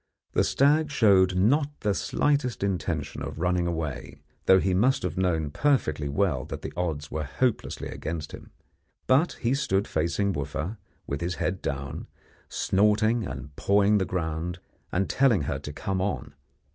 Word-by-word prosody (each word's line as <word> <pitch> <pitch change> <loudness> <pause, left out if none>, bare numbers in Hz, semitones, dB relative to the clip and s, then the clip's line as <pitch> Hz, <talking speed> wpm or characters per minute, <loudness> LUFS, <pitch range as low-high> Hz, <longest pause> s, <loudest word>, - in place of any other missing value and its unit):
The - - +3
stag 150 +2 +3
showed 95 -9 +4
not 140 +10 +2
the 105 -2 +1
slightest 140 0 0
intention 95 -3 -2
of - - -5
running 90 +1 +1
away, 80 -5 -4 0.3
though 95 - +7
he 95 0 +1
must 120 +7 +2
have 90 -2 -2
known 80 -5 0
perfectly 75 - +1
well 75 -4 +1
that - - -7
the - - -5
odds 80 -5 -3
were 80 0 -2
hopelessly 115 - -1
against 80 -2 -5
him; - - -10 0.6
but 140 +7 +3
he 120 +2 -1
stood 100 -8 0
facing 85 +5 0
Wooffa, 75 +8 -3 0.3
with 70 +2 -4
his 85 +1 -2
head 95 +2 -2
down, 70 -1 -4 0.4
snorting 105 +3 +2
and 65 +2 -8
pawing 100 +3 +3
the 95 - +1
ground, 85 0 -3 0.3
and 95 +2 +1
telling 120 - +3
her - - -2
to 75 - -7
come 95 +4 -2
on. 95 0 -3
95 Hz, 160 wpm, -27 LUFS, 80-110 Hz, 0.6 s, though